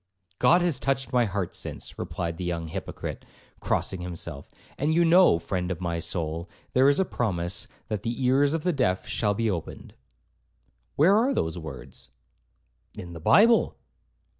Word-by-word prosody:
'God 175 Hz, +1 st, +5 dB
has 165 Hz, -7 st, +1 dB
touched 135 Hz, -2 st, -1 dB
my 125 Hz, -1 st, +4 dB
heart 95 Hz, -3 st, -3 dB
since,' -, -, -4 dB
replied 85 Hz, -1 st, -4 dB
the 90 Hz, -, -5 dB
young 85 Hz, -2 st, -3 dB
hypocrite, -, -, -6 dB, 0.4 s
crossing 95 Hz, -2 st, -1 dB
himself; 85 Hz, -4 st, -7 dB, 0.3 s
'and 155 Hz, +3 st, 0 dB
you 170 Hz, 0 st, +4 dB
know, 175 Hz, -, +6 dB
friend 90 Hz, +1 st, -3 dB
of 90 Hz, -3 st, -3 dB
my 85 Hz, -2 st, -2 dB
soul, 85 Hz, 0 st, -3 dB, 0.2 s
there 130 Hz, +2 st, +5 dB
is 140 Hz, -, +2 dB
a 190 Hz, -, +3 dB
promise, 90 Hz, -, -2 dB, 0.2 s
that 105 Hz, -2 st, -3 dB
the 120 Hz, +3 st, -3 dB
ears 140 Hz, +4 st, +3 dB
of 160 Hz, -, -3 dB
the 180 Hz, -, +1 dB
deaf 95 Hz, -10 st, 0 dB
shall 105 Hz, -2 st, 0 dB
be 115 Hz, +2 st, 0 dB
opened.' 90 Hz, -6 st, -5 dB, 1.0 s
'Where 175 Hz, +8 st, +5 dB
are 240 Hz, +6 st, +2 dB
those 80 Hz, +2 st, -1 dB
words?' 65 Hz, -5 st, -9 dB, 0.9 s
'In 85 Hz, -1 st, -8 dB
the 85 Hz, -, -8 dB
Bible.' 225 Hz, -, +4 dB
100 Hz, 165 wpm, -26 LUFS, 85-140 Hz, 1.0 s, know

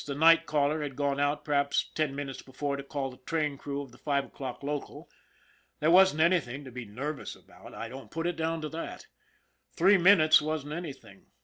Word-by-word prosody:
The 140 Hz, -, -5 dB
night 165 Hz, +2 st, +5 dB
caller 150 Hz, +1 st, +1 dB
had 145 Hz, -3 st, -4 dB
gone 140 Hz, 0 st, 0 dB
out 145 Hz, +1 st, 0 dB
perhaps 140 Hz, -1 st, +1 dB
ten 155 Hz, -3 st, -1 dB
minutes 140 Hz, -2 st, -5 dB
before 140 Hz, +1 st, -4 dB
to 140 Hz, -, -5 dB
call 140 Hz, -1 st, -4 dB
the 130 Hz, -, -14 dB
train 150 Hz, +2 st, -2 dB
crew 140 Hz, +1 st, -5 dB
of 135 Hz, -, -13 dB
the 120 Hz, -, -18 dB
five 140 Hz, -2 st, 0 dB
o'clock 130 Hz, 0 st, -7 dB
local. 145 Hz, 0 st, -5 dB, 0.7 s
There 155 Hz, +2 st, +3 dB
wasn't 185 Hz, -3 st, +6 dB
anything 150 Hz, -6 st, +1 dB
to 130 Hz, -, -10 dB
be 125 Hz, 0 st, -7 dB
nervous 135 Hz, +8 st, -5 dB
about. -, -, -15 dB
I -, -, -5 dB
don't 135 Hz, +1 st, -10 dB
put 165 Hz, +1 st, -4 dB
it 175 Hz, 0 st, 0 dB
down 165 Hz, 0 st, -2 dB
to 155 Hz, -, -4 dB
that. 165 Hz, +2 st, -7 dB, 0.7 s
Three 190 Hz, +3 st, +5 dB
minutes 170 Hz, -5 st, +6 dB
wasn't 150 Hz, -1 st, -3 dB
anything. 155 Hz, -5 st, -8 dB
145 Hz, 200 wpm, -29 LUFS, 140-160 Hz, 0.7 s, wasn't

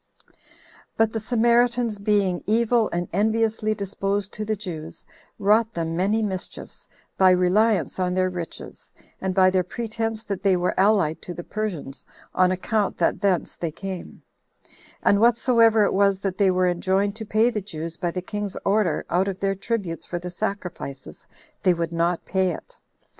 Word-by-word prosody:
9. -, -, -32 dB
7 -, -, -35 dB, 0.6 s
But 225 Hz, -1 st, +2 dB
the 225 Hz, -, -1 dB
Samaritans, 235 Hz, 0 st, +2 dB
being 200 Hz, -3 st, +1 dB
evil 230 Hz, +1 st, +2 dB
and 175 Hz, +1 st, -2 dB
enviously 220 Hz, +1 st, +1 dB
disposed 200 Hz, 0 st, -2 dB
to 215 Hz, -, -4 dB
the 215 Hz, +1 st, -1 dB
Jews, 170 Hz, -6 st, -7 dB, 0.3 s
wrought 215 Hz, +3 st, +2 dB
them 165 Hz, -1 st, -2 dB
many 205 Hz, +5 st, +1 dB
mischiefs, 190 Hz, -3 st, -6 dB, 0.3 s
by 190 Hz, -1 st, +7 dB
reliance 185 Hz, +2 st, +2 dB
on 180 Hz, 0 st, 0 dB
their 185 Hz, 0 st, +1 dB
riches, 175 Hz, -2 st, -8 dB, 0.3 s
and 190 Hz, -1 st, -2 dB
by 185 Hz, -1 st, +5 dB
their 185 Hz, 0 st, +3 dB
pretense 225 Hz, +3 st, -3 dB
that 200 Hz, -3 st, -4 dB
they 195 Hz, -2 st, +3 dB
were 180 Hz, 0 st, 0 dB
allied 190 Hz, -6 st, +2 dB
to 175 Hz, -, -7 dB
the 175 Hz, -, -6 dB
Persians, 190 Hz, -11 st, -4 dB, 0.3 s
on 185 Hz, 0 st, +4 dB
account 200 Hz, +3 st, -1 dB
that -, -, +1 dB
thence 190 Hz, -4 st, +1 dB
they 170 Hz, -, -3 dB
came; 185 Hz, +3 st, -7 dB, 0.8 s
and 200 Hz, -, +4 dB
whatsoever 230 Hz, -1 st, +4 dB
it -, -, +1 dB
was 200 Hz, -1 st, +3 dB
that 195 Hz, -1 st, -3 dB
they 200 Hz, -2 st, +5 dB
were 185 Hz, 0 st, +2 dB
enjoined 190 Hz, +3 st, 0 dB
to 225 Hz, -, -5 dB
pay 220 Hz, +3 st, +2 dB
the 210 Hz, -, -2 dB
Jews 165 Hz, -3 st, -6 dB
by 175 Hz, -, -2 dB
the 180 Hz, +1 st, -4 dB
king's 205 Hz, 0 st, -4 dB
order 200 Hz, -4 st, +1 dB
out 185 Hz, +3 st, +1 dB
of 190 Hz, -1 st, -3 dB
their 195 Hz, 0 st, +1 dB
tributes 195 Hz, -5 st, -3 dB
for 175 Hz, -, -3 dB
the 175 Hz, +1 st, -6 dB
sacrifices, 180 Hz, -8 st, -6 dB, 0.3 s
they 180 Hz, -2 st, +3 dB
would 170 Hz, 0 st, -3 dB
not 170 Hz, +1 st, 0 dB
pay 190 Hz, -1 st, +1 dB
it. -, -, -8 dB
195 Hz, 175 wpm, -24 LUFS, 180-215 Hz, 0.8 s, by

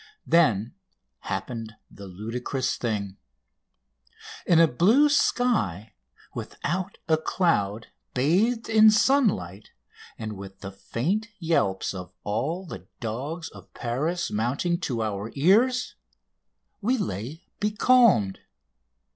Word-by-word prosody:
Then 120 Hz, -, +3 dB, 0.5 s
happened 115 Hz, -3 st, -5 dB, 0.2 s
the 100 Hz, 0 st, -11 dB
ludicrous 115 Hz, +7 st, -3 dB
thing. 100 Hz, -5 st, -3 dB, 1.3 s
In 170 Hz, -2 st, +5 dB
a 165 Hz, -, +7 dB
blue 215 Hz, -, +4 dB
sky 215 Hz, -, +1 dB, 0.4 s
without 180 Hz, +5 st, -4 dB
a 160 Hz, -1 st, +4 dB
cloud, 115 Hz, -, 0 dB, 0.3 s
bathed 195 Hz, -, +2 dB
in 220 Hz, -1 st, +7 dB
sunlight, 210 Hz, -, +2 dB, 0.5 s
and 110 Hz, -1 st, -5 dB
with 95 Hz, 0 st, -10 dB
the 95 Hz, -, -6 dB
faint 160 Hz, -, -2 dB
yelps 130 Hz, -, 0 dB
of 90 Hz, -1 st, -8 dB
all 140 Hz, -, -2 dB
the 170 Hz, -, -9 dB
dogs 140 Hz, +9 st, -4 dB
of -, -, -15 dB
Paris 150 Hz, +9 st, -2 dB
mounting 135 Hz, +11 st, 0 dB
to 125 Hz, -10 st, -2 dB
our 105 Hz, 0 st, -3 dB
ears, 225 Hz, -, +3 dB, 0.9 s
we 245 Hz, +6 st, +1 dB
lay 150 Hz, -, -4 dB, 0.2 s
becalmed! 210 Hz, -, +4 dB
140 Hz, 105 wpm, -26 LUFS, -, 1.3 s, a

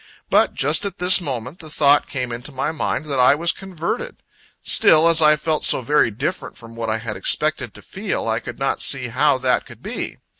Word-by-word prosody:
But, -, -, +2 dB
just 150 Hz, +4 st, +1 dB
at 200 Hz, -3 st, -5 dB
this 180 Hz, +1 st, +4 dB
moment, 130 Hz, 0 st, -6 dB
the 155 Hz, -, -9 dB
thought 145 Hz, -1 st, +2 dB
came 125 Hz, -3 st, -4 dB
into 120 Hz, +5 st, -7 dB
my 135 Hz, +3 st, -2 dB
mind, 155 Hz, -1 st, -3 dB
that 140 Hz, -3 st, -3 dB
I 125 Hz, +3 st, +5 dB
was 170 Hz, +3 st, +1 dB
converted; 190 Hz, -, -5 dB, 0.5 s
still, 160 Hz, +1 st, +4 dB
as 165 Hz, -1 st, +5 dB
I 150 Hz, 0 st, +5 dB
felt 155 Hz, 0 st, -2 dB
so -, -, +3 dB
very 145 Hz, 0 st, +2 dB
different 140 Hz, -, -5 dB
from 115 Hz, 0 st, -13 dB
what 115 Hz, -1 st, -4 dB
I 110 Hz, -, 0 dB
had 110 Hz, -1 st, -6 dB
expected 150 Hz, -7 st, -1 dB
to -, -, -14 dB
feel, 195 Hz, -, -4 dB
I 110 Hz, 0 st, 0 dB
could -, -, -9 dB
not 135 Hz, -, -2 dB
see 130 Hz, -3 st, +2 dB
how 135 Hz, +3 st, +2 dB
that 130 Hz, -1 st, -1 dB
could -, -, -15 dB
be. -, -, -6 dB
145 Hz, 215 wpm, -20 LUFS, 125-160 Hz, 0.5 s, I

